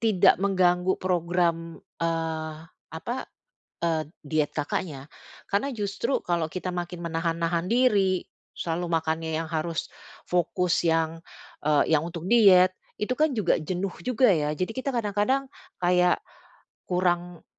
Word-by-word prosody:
tidak 215 Hz, -6 st, +5 dB
mengganggu 185 Hz, -2 st, +2 dB
program, 170 Hz, -2 st, 0 dB, 0.3 s
eee, 160 Hz, -1 st, -2 dB, 0.4 s
apa, 240 Hz, +11 st, -4 dB, 0.6 s
eee, 165 Hz, -2 st, +1 dB, 0.2 s
diet 150 Hz, 0 st, +1 dB
Kakaknya, 145 Hz, -2 st, -3 dB, 0.5 s
karena 205 Hz, +8 st, +1 dB
justru 220 Hz, +3 st, -1 dB
kalau 170 Hz, -2 st, 0 dB
kita 185 Hz, 0 st, -4 dB
makin 175 Hz, 0 st, -4 dB
menahan-nahan 165 Hz, +1 st, -1 dB
diri, 205 Hz, -7 st, +3 dB, 0.3 s
selalu 170 Hz, +1 st, -2 dB
makannya 160 Hz, 0 st, 0 dB
yang 165 Hz, -, -4 dB
harus 160 Hz, 0 st, -2 dB, 0.4 s
fokus 180 Hz, 0 st, +1 dB
yang, 165 Hz, 0 st, +1 dB, 0.4 s
eee, 150 Hz, +1 st, +3 dB
yang 150 Hz, -, +1 dB
untuk 170 Hz, 0 st, -6 dB
diet, 190 Hz, -5 st, +6 dB, 0.3 s
itu 210 Hz, +4 st, 0 dB
kan 310 Hz, +1 st, +2 dB
juga 190 Hz, -5 st, +3 dB
jenuh 185 Hz, +4 st, -3 dB
juga 250 Hz, 0 st, +3 dB
ya, 150 Hz, -3 st, +1 dB
jadi 185 Hz, -, 0 dB
kita 265 Hz, +1 st, -2 dB
kadang-kadang 235 Hz, +4 st, 0 dB, 0.3 s
kayak 180 Hz, 0 st, +3 dB, 0.7 s
kurang 175 Hz, -1 st, 0 dB
175 Hz, 125 wpm, -26 LUFS, 165-195 Hz, 0.7 s, diet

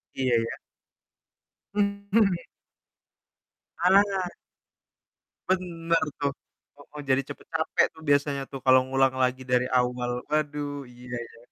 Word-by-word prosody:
Iya 130 Hz, -2 st, +2 dB
iya. 115 Hz, 0 st, -1 dB, 1.2 s
Mhm. 200 Hz, -1 st, +2 dB, 1.4 s
Halangan. 190 Hz, +1 st, +3 dB, 1.2 s
Bener 170 Hz, -3 st, +1 dB, 0.2 s
tuh, 140 Hz, -1 st, +1 dB, 0.4 s
kalau 145 Hz, -, -17 dB
mau 150 Hz, 0 st, -7 dB
jadi 130 Hz, +1 st, +4 dB
cepat 145 Hz, -, -9 dB
capek 160 Hz, 0 st, +2 dB
tuh 160 Hz, -, -15 dB
biasanya 145 Hz, -1 st, +2 dB
tuh 135 Hz, -, -5 dB
kalau 130 Hz, 0 st, +7 dB
ngulang 135 Hz, 0 st, +3 dB
lagi 130 Hz, +1 st, 0 dB
dari 125 Hz, 0 st, +1 dB
awal. 125 Hz, -1 st, 0 dB
Waduh 145 Hz, -2 st, -1 dB
iya 125 Hz, 0 st, -9 dB
iya. 115 Hz, -, -16 dB
145 Hz, 115 wpm, -27 LUFS, 130-175 Hz, 1.4 s, kalau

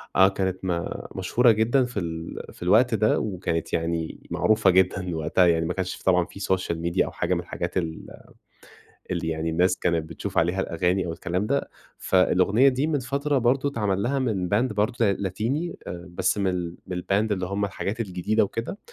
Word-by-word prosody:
آه 95 Hz, +1 st, +7 dB
كانت 95 Hz, -1 st, -1 dB
ما 85 Hz, -2 st, -3 dB
مشهورة 115 Hz, +6 st, +3 dB
جدًا 115 Hz, +4 st, +2 dB
في 125 Hz, -4 st, -4 dB
ال 80 Hz, -1 st, -5 dB
في -, -, -10 dB
الوقت 110 Hz, +7 st, +4 dB
ده، 110 Hz, 0 st, +2 dB
وكانت 90 Hz, -5 st, -3 dB
يعني 80 Hz, -1 st, -2 dB
معروفة 110 Hz, -2 st, +3 dB
جدًا 90 Hz, -1 st, +2 dB
وقتها 80 Hz, +3 st, +3 dB
يعني 80 Hz, -1 st, +2 dB
ما 90 Hz, -, -1 dB
كنش 95 Hz, -1 st, -3 dB
طبعًا 90 Hz, -2 st, +3 dB
في 100 Hz, -, -12 dB
سوشيال 95 Hz, -4 st, -1 dB
ميديا 85 Hz, 0 st, +1 dB
أو -, -, -6 dB
حاجة -, -, -1 dB
من -, -, 0 dB
الحاجات -, -, -4 dB
ال 80 Hz, -3 st, -3 dB, 1.0 s
اللي 85 Hz, -2 st, -2 dB
يعني 80 Hz, 0 st, -1 dB
الناس 90 Hz, +3 st, +2 dB
كانت 85 Hz, -2 st, 0 dB
بتشوف 85 Hz, -, -4 dB
عليها 90 Hz, +3 st, +2 dB
الأغاني 90 Hz, +2 st, 0 dB
أو 85 Hz, -, -3 dB
الكلام 90 Hz, +3 st, -2 dB
ده، 140 Hz, +4 st, -1 dB, 0.3 s
فالأغنية 95 Hz, +7 st, +4 dB
دي 135 Hz, +3 st, +1 dB
من 150 Hz, -3 st, +1 dB
فترة 140 Hz, +3 st, 0 dB
برضه 130 Hz, +3 st, +2 dB
اتعمل 105 Hz, -7 st, -1 dB
لها 135 Hz, +4 st, 0 dB
من 105 Hz, -9 st, -1 dB
باند 115 Hz, +5 st, +1 dB
برضه 105 Hz, +4 st, 0 dB
ل 100 Hz, -, +3 dB
لاتيني، 115 Hz, -, -2 dB
آآ 85 Hz, +1 st, -7 dB
بس 95 Hz, +3 st, +1 dB
من 100 Hz, -, 0 dB
ال 90 Hz, -2 st, -4 dB
من 90 Hz, -, -4 dB
الباند 100 Hz, +4 st, 0 dB
اللي 95 Hz, -2 st, -1 dB
هم 100 Hz, +2 st, -1 dB
الحاجات 100 Hz, +3 st, -4 dB
الجديدة 105 Hz, +1 st, +1 dB
وكده. 115 Hz, -, -5 dB
95 Hz, 190 wpm, -25 LUFS, 90-110 Hz, 1.0 s, آه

